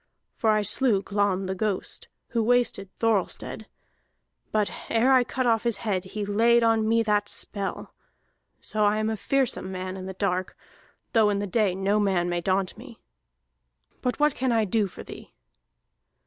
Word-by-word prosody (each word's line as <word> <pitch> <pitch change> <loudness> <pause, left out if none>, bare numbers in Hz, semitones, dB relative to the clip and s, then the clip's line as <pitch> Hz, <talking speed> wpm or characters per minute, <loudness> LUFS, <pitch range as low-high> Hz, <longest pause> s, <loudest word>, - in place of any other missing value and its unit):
For 225 - +1
I 215 -1 +3
slew 205 -1 +2
Glam 200 -2 0
the 190 - -2
ghost 200 0 -3 0.2
who 230 - 0
wasted 235 -4 +1
Thorhallstead, 220 0 -1 0.8
but 210 -1 +1 0.2
ere 240 +4 +4
I 255 -1 +6
cut 255 +1 -2
off 225 -2 +3
his 235 -4 0
head 190 -3 0
he 205 +2 -4
laid 230 +3 +3
on 225 -1 +3
me 230 0 +3
that 210 -1 +1
spell. 200 -2 -4 0.7
So 215 0 -1
I 205 +1 +3
am 215 +1 0
a - - -1
fearsome 260 -4 0
man 185 0 -5
in 190 0 -7
the 190 - -5
dark, 185 -1 -2 0.6
though 220 -2 +5
in 205 - +1
the 200 - -2
day 200 -2 +1
no 195 +2 +1
man 185 -4 +1
may 175 0 -1
daunt 185 +1 0
me. 240 -2 -12 1.0
But 250 +2 -1
what 295 -1 +4
can 260 -1 -1
I 225 -2 +2
do 210 +1 +1
for - - -10
thee?" - - -12
210 Hz, 175 wpm, -26 LUFS, 195-230 Hz, 1.0 s, I